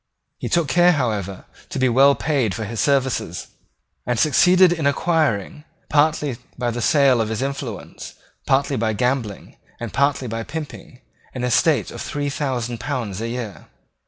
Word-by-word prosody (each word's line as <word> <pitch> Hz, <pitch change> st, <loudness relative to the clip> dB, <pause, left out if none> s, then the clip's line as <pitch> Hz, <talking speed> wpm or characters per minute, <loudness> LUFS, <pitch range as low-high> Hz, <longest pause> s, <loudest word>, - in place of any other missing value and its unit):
He -, -, -4 dB
took 170 Hz, -3 st, +2 dB
care, 175 Hz, +5 st, +4 dB
however, 105 Hz, -, -2 dB, 0.2 s
to -, -, -5 dB
be 130 Hz, -1 st, +3 dB
well 135 Hz, +3 st, +5 dB
paid 135 Hz, -10 st, 0 dB
for 110 Hz, -, -4 dB
his 110 Hz, +2 st, -5 dB
services, 130 Hz, -, 0 dB, 0.5 s
and 125 Hz, -1 st, -1 dB
succeeded 180 Hz, +7 st, +5 dB
in 160 Hz, -4 st, -1 dB
acquiring, 150 Hz, -, 0 dB, 0.3 s
partly 150 Hz, -3 st, +2 dB, 0.2 s
by 120 Hz, -1 st, -1 dB
the 120 Hz, +1 st, -4 dB
sale 135 Hz, -3 st, +4 dB
of 110 Hz, -, -2 dB
his 110 Hz, +3 st, -2 dB
influence, 135 Hz, -5 st, -6 dB, 0.3 s
partly 135 Hz, 0 st, +2 dB
by 110 Hz, -1 st, 0 dB
gambling, 125 Hz, -2 st, -2 dB, 0.2 s
and 120 Hz, -2 st, -6 dB
partly 140 Hz, -2 st, +1 dB
by 115 Hz, 0 st, -3 dB
pimping, 145 Hz, -2 st, -8 dB, 0.3 s
an 125 Hz, -, -4 dB
estate 125 Hz, -, +2 dB
of -, -, -7 dB
three 145 Hz, -1 st, -3 dB
thousand 125 Hz, -5 st, -3 dB
pounds 115 Hz, -6 st, -4 dB
a 115 Hz, -, -3 dB
year. 115 Hz, -4 st, -6 dB
130 Hz, 160 wpm, -21 LUFS, 115-145 Hz, 0.5 s, well